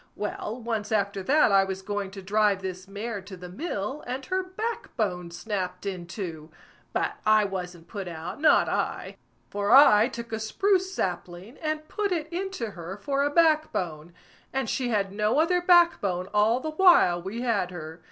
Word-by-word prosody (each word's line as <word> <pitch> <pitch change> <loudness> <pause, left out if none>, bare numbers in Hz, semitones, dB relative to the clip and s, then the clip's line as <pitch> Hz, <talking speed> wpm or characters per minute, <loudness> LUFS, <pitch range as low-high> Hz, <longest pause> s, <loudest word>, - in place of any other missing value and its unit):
Well, 210 +2 -4
once 225 -3 -3
after 200 -2 0
that 275 +4 +4
I 195 0 +6
was 190 0 -5
going 205 -1 -3
to 195 0 -10
drive 200 0 +2
this 185 0 -6
mare 205 +1 -5
to 190 0 -10
the 180 0 -9
mill, 210 - -4
and 260 +2 -4
her 375 +5 0
back 430 +3 -5
bone 180 -6 -1
snapped 180 0 -4
in 185 -3 -4
two; 165 -5 -6 0.4
but - - -1
I 215 -1 +4
wasn't 180 -3 -6
put 200 -2 -6
out, 175 - -7
not 310 - +5
I, - - -2 0.3
for 205 0 -2
I 235 -4 +8
took 235 -3 -8
a 220 - -2
spruce 375 - +1
sapling, 180 - -4
and 310 -1 -3
put 410 +2 -2
it 320 -4 -1
into 360 - -3
her 175 +1 -8
for 275 +7 -1
a 285 - +2
back 315 0 +3
bone, 165 -2 -4 0.4
and 270 -3 -1
she 250 +2 -1
had 200 -4 0
no 210 +4 +1
other 355 +3 +3
back 345 -1 +5
bone 185 -2 -2
all 215 +4 +3
the 310 +4 -4
while 310 - +5
we 200 +6 -5
had 220 -7 0
her. 160 -2 -8
210 Hz, 185 wpm, -26 LUFS, 185-280 Hz, 0.4 s, I